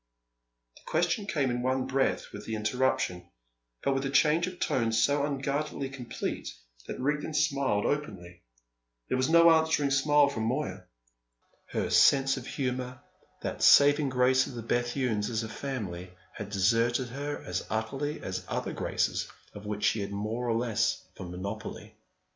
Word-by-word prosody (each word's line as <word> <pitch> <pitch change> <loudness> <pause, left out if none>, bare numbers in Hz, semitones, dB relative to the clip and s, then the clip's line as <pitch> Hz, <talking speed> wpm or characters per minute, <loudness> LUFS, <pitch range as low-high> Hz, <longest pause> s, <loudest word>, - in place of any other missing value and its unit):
The - - -18
question 175 +5 +1
came 140 -9 0
in 120 0 -2
one 130 +1 0
breath 135 0 0
with - - -9
the 110 - -2
interruption, 105 -6 -1 0.5
but 140 - +2
with 135 0 -1
a 135 - -1
change 150 +5 +3
of 185 -1 -8
tone 115 -3 +1
so 140 +6 +2
unguardedly 140 0 -2
complete 130 -3 -5 0.4
that - - -6
Rigden 150 +3 -1
smiled 140 -8 +1
openly. 95 - -3 0.7
There 130 - +1
was 130 +3 +1
no 170 0 +7
answering 160 -3 +2
smile 145 +1 +4
from 115 -6 -3
Moya. 95 -6 -2 0.8
Her - - -2
sense 135 -1 +5
of 130 -2 -7
humour, 125 -1 -3 0.4
that - - -4
saving 145 0 +6
grace 130 0 +3
of 125 - -8
the 115 - -6
Bethunes 120 -2 0
as 115 -1 -1
a 110 - -6
family, 105 -9 -5 0.2
had 105 -1 -7
deserted 115 +5 +2
her 145 +4 -4
as 90 0 -5
utterly 135 +7 -3
as 95 0 -4
other - - -3
graces - - -1 0.2
of 105 0 -9
which 105 0 -4
she 110 - +2
had 100 0 -4
more 110 +4 -3
or 115 - +2
less 115 -1 0
of 90 - -6
a - - -8
monopoly. 100 +5 -7
130 Hz, 160 wpm, -29 LUFS, 110-140 Hz, 0.8 s, no